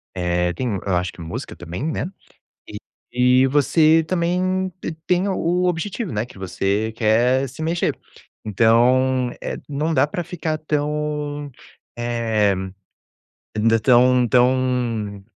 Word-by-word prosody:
eh, 90 -1 0
tem 105 +1 -2
eu 95 -3 +1
acho 90 -1 -1
que - - -12
música 80 0 -6
também, 85 - -7
né. 155 +1 -2 0.6
E - - -7 0.7
e - - +4
você 155 +4 +4
também 185 +2 0
te - - -4
tem 180 +2 +1
o 180 -1 0
objetivo, 180 - -2
né, 105 +1 -2
que 110 - -15
você 100 +3 -1
quer 120 +4 +2
se 135 +5 -9
mexer. 165 +2 0 0.5
Então, 125 +4 +3
eh, - - -3
não 150 +3 -1
dá 130 0 +4
pra 175 +3 -4
ficar 160 -2 -3
tão, 150 -1 -2 0.5
eh, 115 -4 +1 1.0
ainda 115 +1 +3
tão 125 +1 +4
tão 125 -5 +1
130 Hz, 130 wpm, -21 LUFS, 110-155 Hz, 1.0 s, e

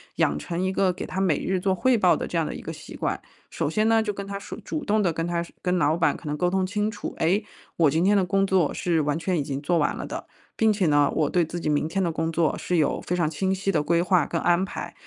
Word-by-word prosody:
养 75 +1 +1
成 170 - -4
一 190 - 0
个 190 -1 +2
给 - - -6
他 190 - -4
每 180 -7 +1
日 185 -1 0
做 190 0 +1
汇 245 +6 +3
报 - - +4
的 - - -3
这 - - -3
样 - - +1
的 - - -5
一 - - -7
个 - - -6
习 - - -10
惯。 - - -2 0.3
首 - - -2
先 215 +1 +1
呢， 225 0 +4
就 210 -2 -2
跟 200 0 -6
他 200 0 -5
说 - - -8
主 310 - -4
动 215 +1 +2
地 175 - +2
跟 165 +1 -3
他 170 0 -1
说 - - -14
跟 180 0 +1
老 155 0 +2
板 165 - +2
可 - - -12
能 150 0 -2
沟 180 +2 +1
通 190 0 +1
清 210 +2 -1
楚： 210 -1 -6
“哎， 190 +6 +2 0.3
我 160 -4 +4
今 160 +3 +1
天 205 - +4
的 195 - +3
工 195 +2 +1
作 185 -6 +2
是 170 -3 0
完 150 +2 -1
全 180 0 -1
已 145 - 0
经 140 0 -4
做 170 +4 +1
完 150 -2 +1
了 - - -5
的。 - - -6 0.3
并 220 -1 +3
且 200 -3 +1
呢， 145 -1 +3
我 155 -2 +1
对 175 -2 +2
自 170 +2 -5
己 155 - -2
明 150 +1 +1
天 195 +4 -1
的 170 - 0
工 160 +1 -2
作 160 -1 +1
是 180 - -2
有 155 - +1
非 180 - -2
常 170 -3 +1
清 190 +5 -1
晰 195 +1 -1
的 155 - +1
规 170 +3 +1
划 180 -3 +2
跟 165 - -2
安 175 +2 +2
排。 195 - -6
180 Hz, 325 characters per minute, -25 LUFS, 160-195 Hz, 0.3 s, 报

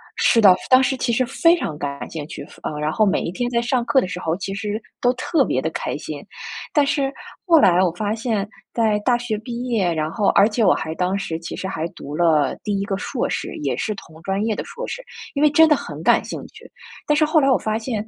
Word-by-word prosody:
是 230 - +3
的， 190 -4 +8
当 260 0 +7
时 265 +1 +1
其 240 -1 0
实 255 +2 +2
非 335 +7 +4
常 160 - -3
感 140 -2 -5
兴 155 -3 -6
趣， 150 -3 -8 0.2
呃， 150 -1 -4
然 150 +1 0
后 215 - +2
每 195 - +1
一 170 - -3
天 245 +5 -2
在 235 - +1
上 245 0 0
课 265 - +4
的 185 - -1
时 180 - -5
候 165 -2 -1
其 195 0 -4
实 210 +1 -3 0.2
都 245 - +4
特 260 +6 +1
别 - - 0
地 - - -1
开 - - -3
心。 - - -7 0.5
但 295 -3 +4
是 280 -2 0 0.4
后 330 -2 +7
来 180 -8 +5
我 180 - +2
发 210 +3 -2
现 220 -3 -1 0.3
在 220 -3 +2
大 240 +3 +2
学 240 -3 -3
毕 235 +2 -6
业， 205 -7 +1
然 155 0 -2
后 210 0 0
而 200 - +5
且 225 +1 0
我 185 - +5
还 160 0 -3
当 185 +3 0
时 165 -5 -4
其 165 - -6
实 190 - -4
还 165 -3 -3
读 145 -2 -8
了 155 -4 +2
第 205 -2 -1
1 - - -1
个 200 - -2
硕 - - -2
士， - - -3
也 - - 0
是 215 - -2
同 160 -4 -13
专 195 +2 -1
业 220 -2 0
的 - - -4
硕 485 +2 -7
士， - - -5 0.3
因 285 - -1
为 300 - +6
真 320 +2 +6
的 300 - +5
很 - - -7
感 - - +4
兴 - - -6
趣。 - - -16 0.4
但 300 - +3
是 310 +1 +4
后 310 +1 +3
来 275 - +3
我 255 - +5
发 215 0 -1
现 220 -2 -4
215 Hz, 275 characters per minute, -21 LUFS, 180-255 Hz, 0.5 s, 的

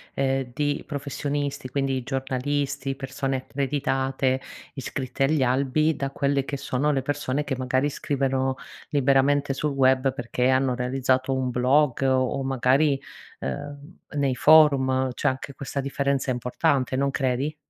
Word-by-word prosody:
ehm, 135 -1 0
di 145 +2 -1
professionisti 145 -1 -3
quindi 135 0 -1
i - - -3
giornalisti, 135 +1 -2
persone 135 0 -3
accreditate, 135 -1 -1 0.3
iscritte 135 0 -2
agli 145 -1 +2
albi, 140 +5 +2
da 140 0 -3
quelle 140 0 0
che 140 +1 -4
sono 135 +3 0
le 135 -3 0
persone 145 0 -1
che 135 - -2
magari 130 +2 0
scrivono 135 -2 -1 0.3
liberamente 140 0 +2
sul 145 +1 -2
web 130 0 +3
perché 125 0 -1
hanno 130 0 +2
realizzato 130 +1 0
un 130 -1 -1
blog, 130 +3 +2
o 130 0 +1
magari, 135 +2 +2 0.4
ehm, 145 - -6 0.2
nei 140 -2 +1
forum 130 -3 +5
c'è 145 - -1
anche 130 +1 -2
questa 140 +1 -4
differenza 140 -1 -1
importante 130 +2 0
non 140 +1 +1
credi? 135 +3 -1
135 Hz, 135 wpm, -25 LUFS, 130-140 Hz, 0.4 s, forum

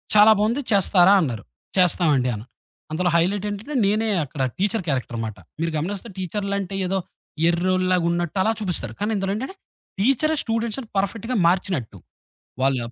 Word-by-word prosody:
చాలా 210 +1 +8
బావుంది 235 +7 +1
చేస్తారా?" 195 0 +5
అన్నారు. 115 -7 -4 0.3
చేస్తామండి 155 -8 +3
అన్నా. 105 +3 -8 0.5
అందులో 175 +3 +1
హైలైట్ 185 +4 +1
ఏంటంటే, 215 +9 -6
నేనే 215 +3 +1 0.2
అక్కడ 140 0 -6 0.2
టీచరు 205 +1 0
క్యారెక్టర్ 125 -4 -2
మాట. 110 -3 -6 0.2
మీరు 165 0 -1
గమనిస్తే 195 +8 -4
టీచర్లంటే 195 +1 -3
ఏదో 190 +1 0 0.5
ఎర్రోల్లాగా 185 0 +1
ఉన్నట్టు 175 +2 -2
అలా 220 - +3
చూపిస్తారు. 175 - -2
కానీ, 210 +2 0
ఇందులో 195 0 -1
ఏంటంటే 265 - -5 0.4
టీచరే 275 +8 +2
స్టూడెంట్స్‌ని 230 +1 -2
పర్ఫెక్ట్‌గా 225 +5 -1
మార్చినట్టు. 170 - -1 0.6
వాళ్ళ 135 -1 +2
190 Hz, 140 wpm, -23 LUFS, 165-210 Hz, 0.6 s, చాలా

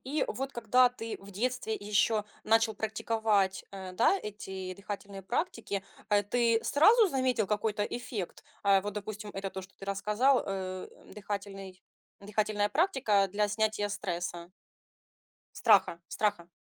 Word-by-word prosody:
И 290 +4 0
вот 270 +1 -3
когда 245 +2 +4
ты 230 -2 -6
в 200 +1 -12
детстве 235 +1 -1
ещё 210 +1 +1 0.2
начал 225 0 +3
практиковать, 215 -2 0
э, 190 -2 -7
да, 230 - +4
эти 190 -3 -6
дыхательные 200 0 -7
практики, 230 - -2 0.3
э, 205 0 +4
ты 230 +2 +2
сразу 425 +9 +5
заметил 255 - +1
какой-то 210 0 0
эффект? 220 -5 -5 0.2
Э, 195 -1 +5
вот, 205 +2 -4
допустим, 210 0 -6
это 195 0 -3
то, 190 - -6
что 185 - -15
ты - - -9
рассказал, 210 +7 +2
э, 185 -1 -4 0.3
дыхательный 195 -2 -6 0.4
дыхательная 210 0 0
практика 260 - +2
для 210 +2 +1
снятия 210 0 0
стресса 175 -3 -4 1.2
страха 170 - +5
страха. 205 -5 0
210 Hz, 135 wpm, -30 LUFS, 195-225 Hz, 1.2 s, сразу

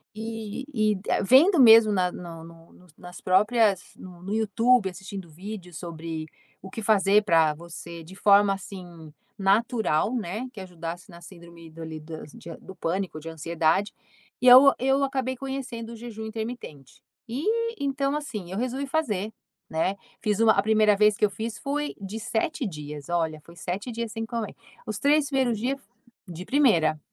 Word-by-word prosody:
e 225 +2 -5
e 215 -3 +2 0.3
vendo 285 - +6
mesmo 225 -3 +8
na 180 -3 +1
no 165 -2 -9
no 165 0 -15
no 180 - -20
nas 180 0 -11
próprias 205 +1 +2
no 180 -2 -12
no 200 +3 -4
YouTube, 225 0 +3
assistindo 190 0 -8
vídeos 180 0 -8
sobre 165 -2 -6 0.3
o 190 - -10
que 225 - -6
fazer 205 0 +4
para 165 -5 +4
você 170 0 -9
de 180 +4 -13
forma, 200 0 +5
assim, 175 -5 -10 0.3
natural, 215 0 +1
né, 220 +3 -3
que 210 - -10
ajudasse 175 +1 -7
na 170 -1 -12
síndrome 170 -1 -13
do 165 +1 -11
ali, 160 -1 -6
das 155 -1 -9
de 165 - -10
do 190 - -12
pânico 180 -1 -2
ou - - -8
de 165 - -7
ansiedade 165 +4 0 0.5
e, 255 - +2
aí, 250 - +12 0.2
eu 270 +2 +2
acabei 265 -1 -1
conhecendo 255 -3 -6
o - - -8
jejum 220 -1 -8
intermitente 220 - -7 0.3
e, 445 - -1
então, 275 +1 0
assim, 215 -12 -5
eu 190 - -4
resolvi 255 +3 -2
fazer, 220 -9 -1 0.4
né, 165 +5 0 0.3
fiz 210 -1 0
um 225 - +5
a 200 - +5
1ª 215 -1 +4
vez 210 +1 +4
que - - -5
eu 205 - 0
fiz 220 +2 -5
foi 295 0 -2
de 200 +3 -5
7 245 +5 -2
dias, 150 -4 -7
olha, 160 -3 -1
foi 170 - -15
7 190 +8 -4
dias 230 -1 -4
sem 225 +1 -4
comer, 230 -2 -4 0.3
os 215 -1 -3
3 290 +1 +3
1º 255 -6 +1
dia, 255 +4 0 0.5
de 175 0 -7
primeira, 170 - +3
205 Hz, 175 wpm, -26 LUFS, 170-235 Hz, 0.5 s, aí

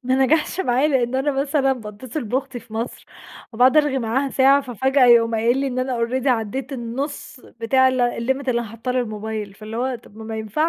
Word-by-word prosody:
ما 255 +1 +1
نجحش 320 +5 +1
معايا 260 -3 +2
لأن 255 -3 +1
أنا 270 +2 +1
مثلًا 275 0 +1
باتصل 245 +4 -6
بأختي 260 +2 -3
في 220 - -19
مصر 225 +2 -5 0.5
وباقعد 250 +5 +4
أرغي 295 -3 +3
معاها 260 +4 -1
ساعة 275 +2 +4
ففاجأة 265 +1 +1
يقوم 230 -1 +5
قايل 230 +3 +2
لى 275 - 0
إن 255 -1 -3
أنا 255 -1 -1
already 250 +3 -1
عديت 250 +2 -1
النُص 265 +3 -5 0.2
بتاع 260 +3 +4
ال 255 -1 0
ال 240 -1 0
limit 265 +1 -1
اللي 240 -1 +1
أنا 235 - -6
حاطاه 230 +3 -4
للموبايل 215 -4 -3
فاللي 215 +1 -8
هو 255 +2 -1
طب 230 -3 -13
ما 220 - -9
ما 220 0 -5
ينفعش. 220 +9 -1
250 Hz, 210 wpm, -21 LUFS, 230-270 Hz, 0.5 s, يقوم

